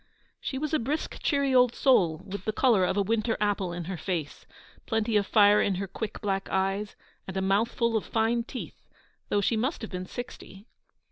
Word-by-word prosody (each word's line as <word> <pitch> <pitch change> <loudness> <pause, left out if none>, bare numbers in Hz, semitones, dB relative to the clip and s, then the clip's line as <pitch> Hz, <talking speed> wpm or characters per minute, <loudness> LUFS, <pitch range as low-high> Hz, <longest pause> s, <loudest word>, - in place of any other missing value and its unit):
She 265 - -4
was 305 +3 -3
a 310 - +3
brisk, 280 +7 -3
cheery 280 -2 +1
old 250 -2 +5
soul, 175 - +3
with 200 0 -7
the 215 - +1
colour 215 -5 +3
of 185 - -1
a 200 - +3
winter 225 +2 0
apple 205 -3 0
in 175 0 -4
her 180 +2 -5
face, 165 -4 -4 0.4
plenty 220 0 0
of 205 -1 +2
fire 205 -1 +6
in 195 - +1
her 195 +2 -2
quick 210 +2 -6
black 195 -2 -2
eyes, 195 +2 -1 0.3
and 190 0 -5
a - - +2
mouthful 225 +4 +1
of 220 - +1
fine 230 +1 +1
teeth, 245 +2 -9 0.4
though 205 - +2
she 225 - +1
must 250 +5 -1
have 220 - -6
been 180 -1 -5
sixty. 210 -5 -9
210 Hz, 200 wpm, -28 LUFS, 190-235 Hz, 0.4 s, fire